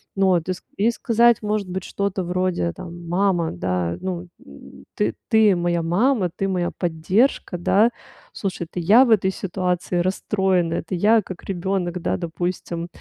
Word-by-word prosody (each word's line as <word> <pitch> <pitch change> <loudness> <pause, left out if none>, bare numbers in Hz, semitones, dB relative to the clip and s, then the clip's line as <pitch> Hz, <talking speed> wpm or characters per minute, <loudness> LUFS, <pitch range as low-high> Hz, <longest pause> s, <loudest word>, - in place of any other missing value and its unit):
ну 195 -1 +3
вот, 175 -3 +2
и - - +2
ск 180 - -13
и 215 +4 +3
сказать, 235 0 +3
может 210 -2 -2
быть, 185 0 -4
что-то 200 -1 -2
вроде, 180 - -1
там: 170 0 -9
"Мама, 175 -2 +1
да, 90 -1 -2
ну, 180 -1 -4 0.2
м, 70 0 -14
ты, 110 +2 0
ты 220 -4 +5
моя 175 0 0
мама, 190 +4 +2
ты 195 - -2
моя 180 -2 -1
поддержка, 180 +5 0
да, 200 +6 +3 0.4
слушай, 190 -4 -4
это - - -4
я 205 +9 +6
в - - -1
этой 195 -4 +3
ситуации 180 -1 -2
расстроена, 185 -1 0
это 170 +2 -3
я 215 +5 +4
как 185 -2 -9
ребенок, 180 -1 -2
да, 170 - 0
допустим, 170 0 -4
185 Hz, 165 wpm, -22 LUFS, 170-195 Hz, 0.4 s, я